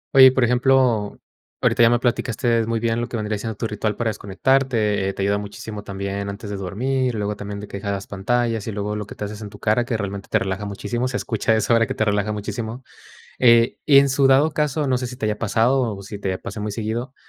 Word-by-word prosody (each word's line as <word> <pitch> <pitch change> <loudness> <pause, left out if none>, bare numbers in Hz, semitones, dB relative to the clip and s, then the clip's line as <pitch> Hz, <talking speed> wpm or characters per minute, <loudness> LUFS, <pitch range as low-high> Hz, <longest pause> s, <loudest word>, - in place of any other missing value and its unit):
Oye, 135 -1 +10
y - - +6
por 130 -1 +1
ejemplo, 125 -3 +2 0.4
ahorita - - +2
ya 115 - +7
me 120 - +3
platicaste 120 -1 0
muy 115 0 0
bien 115 0 0
lo 120 - -2
que 120 - -3
vendría 105 0 -2
siendo 110 +1 -4
tu 115 - -3
ritual 105 -1 -2
para 115 0 -1
desconectarte, 105 -1 +1
eh, - - -3
te 95 - -3
ayuda 100 +1 +1
muchísimo 105 +1 -7
también 100 0 -4
antes 100 +1 -7
de - - -3
dormir, 125 +7 -1
luego 105 0 -2
también 100 0 -6
de 105 - -8
que 100 - -7
dejabas 100 -1 -3
pantallas, 115 +2 -1
y - - -2
luego 105 0 -3
lo 105 -1 -5
que - - -10
te - - -6
haces 105 +1 -7
en 105 - -6
tu 100 - -13
cara, 110 +3 +1
que 120 -2 -1
realmente 100 -1 -5
te - - +3
relaja 95 +1 -3
muchísimo, 105 +5 -3
se 125 0 -2
escucha 110 0 0
eso 110 +2 +1
ahora 115 -1 +4
que - - -4
te 110 - +1
relaja 105 0 0
muchísimo. 110 +3 -5 0.6
Eh, 115 -1 +5
y 140 -2 +7
en 140 0 +5
su 135 +1 +3
dado 135 +4 +5
caso, 150 -1 0
no 130 -1 +2
sé, 125 - -3
si 125 - -7
te 125 -3 -3
haya 105 0 -1
pasado, 115 +1 +1
o 100 - -9
si 100 +1 -8
te 95 -2 -2
pasa - - -7
muy 105 0 -3
seguido, 115 +4 -4
110 Hz, 250 wpm, -22 LUFS, 100-120 Hz, 0.6 s, Oye